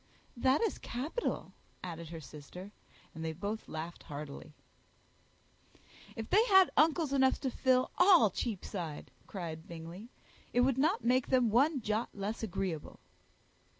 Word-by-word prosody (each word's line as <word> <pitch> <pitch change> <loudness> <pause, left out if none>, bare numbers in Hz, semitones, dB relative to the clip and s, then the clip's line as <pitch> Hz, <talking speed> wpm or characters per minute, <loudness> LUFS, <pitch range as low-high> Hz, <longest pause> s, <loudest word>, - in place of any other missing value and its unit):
"That 260 +3 +3
is 450 -4 0
capital," 295 - -3 0.3
added 170 -3 -6
her 165 -1 -7
sister; 160 +6 -10 0.4
and 160 - -7
they 160 0 -2
both 205 +6 -4
laughed 160 +2 -6
heartily. 150 +1 -8 1.6
"If 225 -1 -5
they 425 +3 +6
had 380 -5 +6
uncles 310 -1 +3
enough 265 -1 +3
to 265 -2 -1
fill 255 0 +2
all 355 - +7
Cheapside," 180 - -4 0.2
cried 165 -4 -6
Bingley, 170 +6 -9 0.4
"it 245 - +4
would 265 0 +2
not 320 +10 +2
make 255 +1 +3
them 250 -4 +3
one 275 +4 +3
jot 215 +2 -1
less 205 +3 -3
agreeable." 190 -6 -4
220 Hz, 135 wpm, -33 LUFS, 170-265 Hz, 1.6 s, all